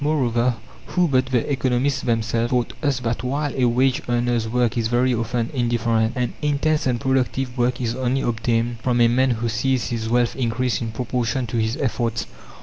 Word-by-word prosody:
Moreover, 125 -5 +1 0.3
who 180 -1 +2
but 130 -3 +2
the 125 -3 0
economists 130 +1 +1
themselves 115 0 0
taught 125 -2 0
us 140 -4 0
that 115 0 -2
while 140 +3 -1
a 130 - +2
wage 125 +2 +2
earner's 120 -1 +1
work 125 0 +1
is 115 -2 0
very 125 +2 +2
often 115 0 -1
indifferent, 115 -2 +1
an 125 -2 -1
intense 150 0 +1
and 120 -2 0
productive 130 0 0
work 125 0 0
is 115 -2 -1
only 130 +1 0
obtained 115 0 -1
from 120 0 +1
a 120 - +6
man 130 +3 +2
who 120 -1 -1
sees 125 +3 0
his 110 -2 -3
wealth 120 0 +2
increase 125 -1 -1
in 115 -1 -3
proportion 125 +2 -1
to 115 +1 -3
his 110 +3 0
efforts? 115 -3 -1
120 Hz, 185 wpm, -22 LUFS, 115-130 Hz, 0.3 s, a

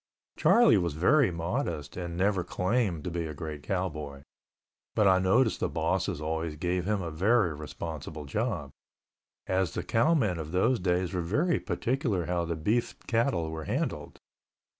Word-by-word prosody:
Charlie 235 - +5
was 85 -4 -2
very 125 - +4
modest 85 -3 -3
and 85 -2 -5
never 95 -1 +2
claimed 90 -2 0
to 90 - -4
be 85 -1 -2
a 75 - -7
great 75 -1 -6
cowboy, 75 -6 -3 0.7
but 105 -2 +4
I 95 -1 +5
noticed 110 +6 +3
the - - 0
bosses - - -1
always 80 0 -2
gave 90 +3 -1
him 105 -2 0
a 85 - -4
very 95 +2 +2
responsible 75 0 -6
job, 90 - -2 0.7
as 95 -2 0
the - - -2
cowmen 115 - +2
of 80 +1 -6
those 115 +7 +2
days 90 0 0
were 90 - 0
very 150 - +1
particular 115 - -1
how 85 0 -1
the 85 0 -2
beef 110 +10 0
cattle 115 -9 0
were 80 -1 -5
handled. 120 - -3
90 Hz, 160 wpm, -29 LUFS, 80-110 Hz, 0.7 s, Charlie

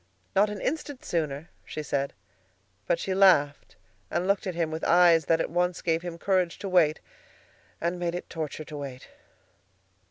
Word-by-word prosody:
"Not 205 +2 +4
an 210 -1 -5
instant 290 0 -3
sooner," 155 -2 -2
she 155 - -6
said. 140 -1 -1 0.7
But - - +2
she 190 +3 -2
laughed 175 -7 +4 0.3
and 180 - -1
looked 200 0 +1
at 180 - -3
him 165 -2 -1
with 160 +1 -5
eyes 170 -2 +5
that 165 +1 +3
at - - -2
once 175 +1 0
gave 165 -1 +1
him 175 -1 -6
courage 185 -1 +1
to 200 - -6
wait 170 -5 +3 0.8
and 170 +1 -2
made 175 -1 -1
it 175 - -5
torture 155 -1 -5
to 150 - -8
wait. 135 -3 -8
170 Hz, 170 wpm, -27 LUFS, 155-185 Hz, 0.8 s, eyes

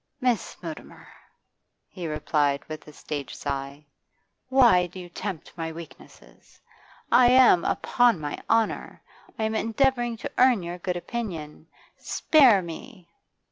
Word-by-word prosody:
'Miss 250 -4 -1
Mutimer,' - - -10 0.7
he 175 -3 -7
replied, 150 -2 0
with 155 0 -9
a - - -11
stage 145 -1 -6
sigh, 140 +2 -5 0.6
'why 240 -9 +5
do 180 +2 -11
you 175 -1 -9
tempt 185 -2 -6
my 165 -1 -4
weakness? 165 0 -14 0.5
I 250 - +6
am 250 -9 +6 0.4
on 240 -7 +5
my 145 -1 -5
honour; 225 -1 0 0.3
I 220 - -2
am 220 0 -1
endeavouring 240 +1 0
to - - -6
earn 250 -6 +4
your 175 +1 -6
good 180 0 -3
opinion. 170 -8 -6 0.3
Spare 255 - +4
me! 175 +2 -10
180 Hz, 130 wpm, -25 LUFS, 160-235 Hz, 0.7 s, I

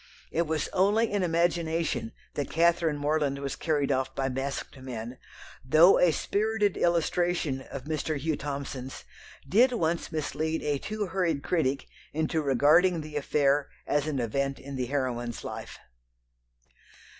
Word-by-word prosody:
It 170 0 0
was 155 -1 -1
only 205 +5 +2
in 205 -1 0
imagination 165 -7 0 0.2
that 145 - -3
Catherine 165 -2 +2
Morland 145 -1 0
was 140 0 -4
carried 145 -4 0
off 130 0 -1
by 135 0 0
masked 135 +1 -4
men, 125 -1 -7 0.4
though 155 +8 +6
a 180 - +5
spirited 210 +3 0
illustration 170 -4 +1
of 135 - -6
Mr. 155 +1 -2
Hugh 155 +2 -1
Thomson's 140 -2 -5 0.4
did 240 - +4
once 170 -6 -1
mislead 160 +1 -2
a 145 -2 0
too 215 +4 -3
hurried 170 -6 -1
critic 140 -6 0 0.3
into 160 +1 0
regarding 155 +6 +4
the 150 0 -9
affair 145 0 +2 0.2
as 145 0 0
an 150 -3 -1
event 135 +4 -1
in 140 0 -8
the 125 -1 -2
heroine's 120 -4 -2
life. - - -7
150 Hz, 140 wpm, -28 LUFS, 135-170 Hz, 0.4 s, though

